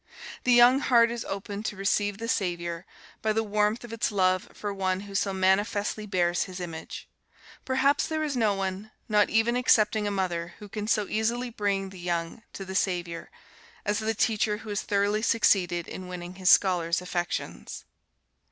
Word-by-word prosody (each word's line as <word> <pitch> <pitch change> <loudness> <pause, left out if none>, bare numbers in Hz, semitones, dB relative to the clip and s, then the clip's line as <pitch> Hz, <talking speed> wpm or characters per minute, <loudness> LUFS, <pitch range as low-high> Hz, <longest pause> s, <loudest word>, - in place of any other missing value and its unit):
The 250 - +3
young 245 +2 +7
heart 235 -4 +4
is 235 -1 -4
opened 200 +2 -5
to - - -4
receive 200 +1 0
the 230 +2 -5
Saviour, 175 -4 -2 0.3
by 220 - +1
the 225 +1 +1
warmth 210 +2 0
of 235 -1 -8
its 230 0 -1
love 185 -2 +1
for 205 -1 -5
one 190 -1 -1
who 200 -1 -10
so 195 0 0
manifestly 205 +3 0
bears 175 -3 +1
his 185 -1 -8
image. 165 -3 -7 0.6
Perhaps 265 +2 +2
there 315 -1 -2
is 295 -3 -2
no 220 -4 +2
one, 195 +2 -4 0.2
not 210 -1 +3
even 225 +2 +2
excepting 215 -4 +3
a - - +1
mother, 175 -3 -2
who 210 - -10
can 210 +1 -5
so 210 -3 +1
easily 235 +3 -1
bring 200 -3 -1
the 190 - -11
young 175 +3 -3
to 195 - -7
the 190 - -7
Saviour, 175 -3 -2 0.6
as 205 - +1
the 220 0 -1
teacher 210 -1 +1
who - - -8
has 205 -1 -1
thoroughly 205 +1 +1
succeeded 180 -7 +2
in 185 - -7
winning 180 0 -7
his 185 -1 +1
scholars' 175 -3 +4
affections. 175 -1 -4
205 Hz, 180 wpm, -27 LUFS, 185-220 Hz, 0.6 s, young